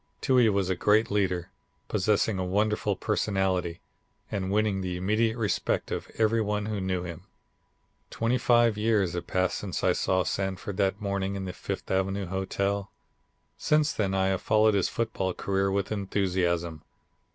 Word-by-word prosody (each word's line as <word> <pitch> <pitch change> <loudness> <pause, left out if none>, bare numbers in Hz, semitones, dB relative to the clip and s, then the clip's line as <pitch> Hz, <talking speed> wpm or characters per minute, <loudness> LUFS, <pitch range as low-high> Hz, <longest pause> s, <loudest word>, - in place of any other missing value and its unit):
Toohey 125 -4 +4
was 100 -2 +1
a - - +1
great 105 +4 +3
leader, 95 -4 0 0.4
possessing 105 0 +1
a - - 0
wonderful 105 +2 0
personality, 95 -5 -1 0.5
and 95 -2 -2
winning 105 -1 +1
the 90 -1 -3
immediate 110 +5 +1
respect 105 -5 -1
of - - -4
every 115 0 +3
one 105 -1 -1
who 105 -2 -3
knew 95 -1 -1
him." 85 +1 -8 0.8
Twenty 115 +3 0
five 120 -3 +3
years 105 -5 +2
have 85 0 -4
passed 95 0 0
since 95 -3 -4
I - - +4
saw 95 -1 +1
Sanford 95 +1 -3
that 100 0 +1
morning 100 -1 -2
in 95 -1 -4
the 90 - -5
Fifth - - -5
Avenue 95 +1 0
Hotel. 100 +2 -2 0.7
Since 150 0 +2
then 95 -3 -1
I 95 0 +2
have 95 -1 -1
followed 110 0 +3
his 100 -3 +1
football 100 -5 -2
career 95 0 0
with 100 0 -1
enthusiasm. 90 -5 -1
100 Hz, 160 wpm, -27 LUFS, 95-105 Hz, 0.8 s, Toohey